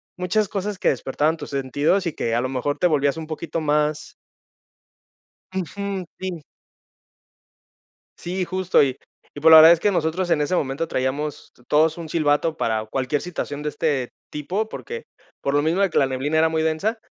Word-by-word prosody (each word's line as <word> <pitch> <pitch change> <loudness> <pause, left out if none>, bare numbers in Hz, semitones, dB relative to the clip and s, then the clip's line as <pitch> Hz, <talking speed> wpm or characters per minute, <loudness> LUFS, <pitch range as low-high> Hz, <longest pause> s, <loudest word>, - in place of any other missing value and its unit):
muchas 190 +4 0
cosas, 200 +1 -3
que - - +2
despertaban 145 +5 0
tus - - -8
sentidos, 145 +7 0
y 170 - -2
que 115 -4 -1
a 120 - +1
lo 130 - -2
mejor 135 +3 -2
te 180 - 0
volvías 145 -3 +2
un 160 - -5
poquito 160 +1 -4
más 150 0 0 1.4
Ujú. 190 +2 -3
Sí. 185 -4 -5 1.8
Sí, 185 +2 -2
justo. 185 0 +2
Y 130 -2 0 0.4
y 145 - -8
pues 160 +2 +6
la 160 - +12
verdad 160 +1 +10
es 170 - +6
que 205 +5 +1
nosotros 175 +1 0
en 150 - +3
ese 150 +5 +1
momento 145 +2 -2
traíamos 140 +3 -3 0.2
todos 155 +2 +3
un 165 -2 -7
silbato, 155 0 +1
para 110 -1 -1
cualquier 135 +5 -1
situación 150 -4 -5
de 150 - -2
este 145 -5 -1 0.2
tipo, 185 +9 -3
porque, 465 - -7 0.4
por 140 - -1
lo 145 - +3
mismo 165 +5 +1
de 195 -2 +3
que - - +1
la 135 - +4
neblina 135 +4 -1
era 160 +1 +4
muy 160 0 0
densa, 190 +9 0
155 Hz, 180 wpm, -22 LUFS, 145-180 Hz, 1.8 s, la